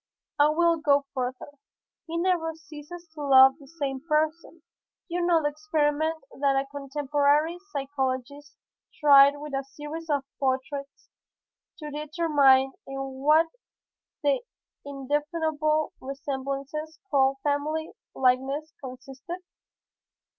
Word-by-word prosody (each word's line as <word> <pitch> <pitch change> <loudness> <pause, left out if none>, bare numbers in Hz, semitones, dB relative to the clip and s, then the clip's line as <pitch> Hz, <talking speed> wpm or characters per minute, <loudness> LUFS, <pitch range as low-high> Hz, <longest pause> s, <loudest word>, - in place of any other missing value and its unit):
I 295 +1 +6
will 335 +2 +3
go 285 -2 +2
further; 260 +2 -5 0.5
he 335 +1 -3
never 340 -2 0
ceases 315 +3 -11
to 305 - -8
love 265 0 +6
the 280 - -15
same 280 -3 -4
person. 315 +1 -1 0.4
You 350 0 -2
know 340 -2 +3
the 295 - +2
experiment 310 +1 -1 0.2
that 275 -1 +2
a 270 0 +1
contemporary 290 +3 +1
physiologist 275 0 -3 0.4
tried 280 -2 +8
with 295 0 -8
a 270 0 -1
series 295 +4 -8
of 285 -2 +1 0.2
portraits 275 +1 -3 0.7
to 300 -3 -7
determine 290 -3 +3 0.2
in 270 0 -5 0.2
what 305 +3 +5 0.8
the 285 -2 +2 0.4
indefinable 300 +2 -1
resemblances 275 +3 -5
called 270 -1 +3
family 300 +2 -1 0.2
likeness 265 +4 +1
consisted? 265 +7 -8
290 Hz, 110 wpm, -26 LUFS, 275-315 Hz, 0.8 s, tried